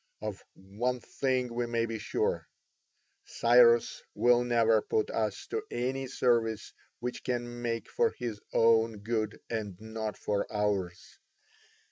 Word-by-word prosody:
Of 105 -3 -5
one 110 +7 -3
thing 130 -2 -1
we 120 0 -1
may 115 -1 0
be 115 -1 -4
sure: 445 - -1 0.8
Cyrus 470 0 +4
will 120 0 +4
never 115 -2 +3
put 110 +1 -1
us 110 -3 -2
to - - -1
any 130 +2 -2
service 115 -4 0 0.3
which 125 +1 -4
can 120 -1 -3
make 115 -1 -2
for 470 -1 +2
his 110 -4 -4
own 115 -2 +3
good 110 -1 -2
and 105 -5 -4
not 110 -1 -5
for 100 -1 -2
ours. 100 -4 -2
115 Hz, 130 wpm, -30 LUFS, 110-125 Hz, 0.8 s, Cyrus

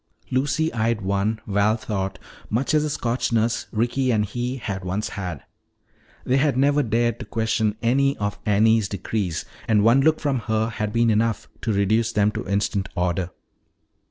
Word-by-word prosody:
Lucy 140 +5 +1
eyed 115 -1 0
one, 100 +3 0
Val 105 +2 +2
thought, 95 -4 -3 0.3
much 130 +7 0
as 155 -1 +3
a 155 - -1
Scotch 125 -4 -1
nurse 115 0 +1
Ricky 120 +4 0
and 110 -3 +2
he 120 +5 -3
had 100 -6 -4
once 95 +4 -2
had. 90 -8 -5 0.8
They 130 - +2
had 135 -2 +2
never 145 +2 +3
dared 120 -1 -1
question 110 -1 0
any 135 +4 +2
of 105 0 -3
Annie's 110 0 +3
decrees, 100 -3 -3 0.2
and 105 -2 +3
one 115 +5 +5
look 155 +2 +3
from 140 -4 0
her 110 +1 +1
had 105 -2 -3
been 115 0 +3
enough 110 +1 0
to 115 - -1
reduce 105 +3 +1
them 105 0 +3
to - - -5
instant 100 -1 0
order. 90 0 0
110 Hz, 165 wpm, -23 LUFS, 100-120 Hz, 0.8 s, one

